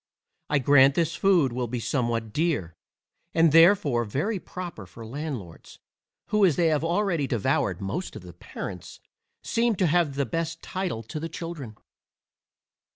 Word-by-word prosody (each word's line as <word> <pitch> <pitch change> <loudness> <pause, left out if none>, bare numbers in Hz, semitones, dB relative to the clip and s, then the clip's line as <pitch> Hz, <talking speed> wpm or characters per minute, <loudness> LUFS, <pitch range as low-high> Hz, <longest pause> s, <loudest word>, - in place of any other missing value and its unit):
I 150 - +3
grant 135 0 +5
this 165 -1 0
food 175 -10 +3
will 125 0 -2
be 120 +1 -3
somewhat 115 -3 -2
dear, 145 - 0 0.6
and 165 -1 +5
therefore 165 -7 +5
very 150 - -2
proper 175 - -8
for 115 +6 -11
landlords, 125 - -7 0.5
who, 210 -1 +2
as 175 -7 +5
they 170 -2 +3
have 155 -1 +1
already 170 -4 0
devoured 100 -5 0
most 150 - -4
of - - -9
the 90 -1 -11
parents, 85 +1 -8 0.4
seem 230 -1 +1
to 185 - +1
have 165 -3 +2
the 140 0 0
best 165 +5 -3
title 180 -12 -3
to 115 +8 -6
the 165 +2 -5
children. 155 -9 -7
150 Hz, 155 wpm, -26 LUFS, 115-170 Hz, 0.6 s, grant